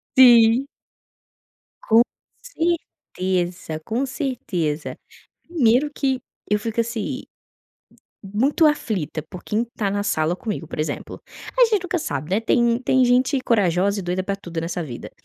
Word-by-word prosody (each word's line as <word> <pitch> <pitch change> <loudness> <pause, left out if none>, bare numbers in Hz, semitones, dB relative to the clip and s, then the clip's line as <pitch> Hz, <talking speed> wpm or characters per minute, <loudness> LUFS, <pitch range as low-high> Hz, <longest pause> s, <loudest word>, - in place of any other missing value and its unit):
Sim. 240 0 +7 1.2
Com 225 +1 +6 0.4
certeza, 185 - -2
com 240 +5 -1
certeza. 185 - -3 0.5
Primeiro 290 -3 +2
que 265 -3 0 0.3
eu 210 0 +2
fico, 225 +2 -1
assim, 230 +3 -4 1.0
muito 240 - +2
aflita 210 - 0
por 180 -2 -9
quem 215 +2 0
está 220 -4 -3
na 205 0 -1
sala 160 -3 0
comigo, 195 -5 -5
por - - -7
exemplo, 155 -2 -4 0.4
a - - +8
gente 425 -5 0
nunca 365 0 -1
sabe, 145 - -4
né, 200 - +3
tem 235 +1 +2
tem 260 0 +3
gente 255 +3 +3
corajosa 200 -3 +2
e - - -5
doida 180 +1 -1
para 200 +1 -2
tudo 175 -4 -6
nessa 170 +1 -3
vida. 125 -6 -8
225 Hz, 140 wpm, -22 LUFS, 180-260 Hz, 1.2 s, a